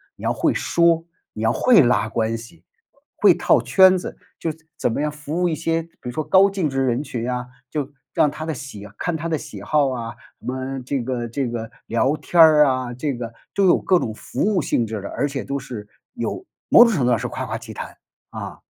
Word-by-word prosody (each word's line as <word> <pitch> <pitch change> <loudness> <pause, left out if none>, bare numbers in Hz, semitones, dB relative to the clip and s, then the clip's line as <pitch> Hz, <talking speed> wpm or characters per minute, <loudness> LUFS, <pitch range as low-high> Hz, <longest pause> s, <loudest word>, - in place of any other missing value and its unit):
你 - - -14
要 - - +1
会 - - +1
说， 170 -1 +2 0.3
你 110 - -5
要 115 - +3
会 230 - +5
拉 120 -4 +2
关 115 0 -1
系、 115 +9 -13 0.5
会 - - +6
套 - - +3
圈 190 -1 +6
子， 180 - -7 0.2
就 165 - -1 0.3
怎 - - 0
么 125 - -2
样 150 0 0
服 150 +3 -4
务 180 - +3
一 160 - -1
些， 165 +1 0
比 165 - -20
如 125 - -4
说 155 - -2
高 190 +5 +5
净 190 -6 -1
值 135 0 0
人 125 +1 +1
群 120 -5 -4
啊， 125 0 -3 0.2
就 145 -2 -3 0.2
让 150 - +3
他 155 +2 -6
的 160 - -2
喜 125 -8 -8
看 175 - -1
他 165 +2 -4
的 160 -2 0
喜 145 - -9
好 150 -3 +2
啊， 115 -3 -5 0.2
什 - - -17
么 130 +1 -3
这 135 0 -1
个 120 -1 -3
这 130 +3 -2
个 115 -1 -5 0.2
聊 130 +5 +1
天 175 - -2
儿 155 -2 +8
啊， 130 -2 -1
这 140 +3 -2
个 120 -1 -6 0.2
都 200 - +3
有 175 - +5
各 185 - +3
种 110 - -3
服 - - -6
务 200 -4 +2
性 120 - 0
质 110 -2 -5
的， 100 - -6
而 145 - -1
且 140 -2 -4
都 140 - -3
是 120 -6 -8 0.3
有 360 - -4 0.2
某 - - +9
种 230 - +2
程 145 - 0
度 - - +3
上 115 - +4
是 125 - -3
夸 130 +1 -5
夸 110 +1 -3
其 115 -1 -10
谈， - - -8 0.3
啊。 - - -7
135 Hz, 255 characters per minute, -22 LUFS, 120-160 Hz, 0.5 s, 某